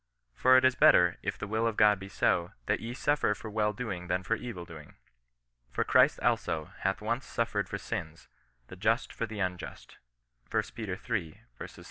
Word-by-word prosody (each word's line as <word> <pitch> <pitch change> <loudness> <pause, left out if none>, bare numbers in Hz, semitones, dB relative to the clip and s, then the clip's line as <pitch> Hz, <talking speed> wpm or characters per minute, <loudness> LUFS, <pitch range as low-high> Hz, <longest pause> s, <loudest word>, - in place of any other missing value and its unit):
" - - -49
For 130 0 +7
it 130 - +4
is 130 - +5
better, 90 -8 +5
if - - -3
the - - -5
will 110 +2 0
of 110 - -2
God 105 -2 +5
be 95 0 -9
so, 85 -3 +1
that - - +1
ye 120 +2 -6
suffer 145 -7 +1
for 105 +1 -8
well 105 0 +1
doing 100 -5 -5
than 90 +1 -1
for 110 - 0
evil 115 -7 -7
doing. 80 -3 -12 0.7
For 60 - -1
Christ - - +4
also 80 -1 0
hath 95 +2 -1
once 115 +4 -1
suffered 115 -4 -1
for - - -3
sins, 80 0 -6 0.4
the 95 - -11
just 110 +5 0
for 115 - -3
the 105 -1 -7
unjust." 90 -2 -5 0.5
lb. 105 -3 -3
iii. 85 -9 -2
105 Hz, 185 wpm, -30 LUFS, 90-115 Hz, 0.7 s, For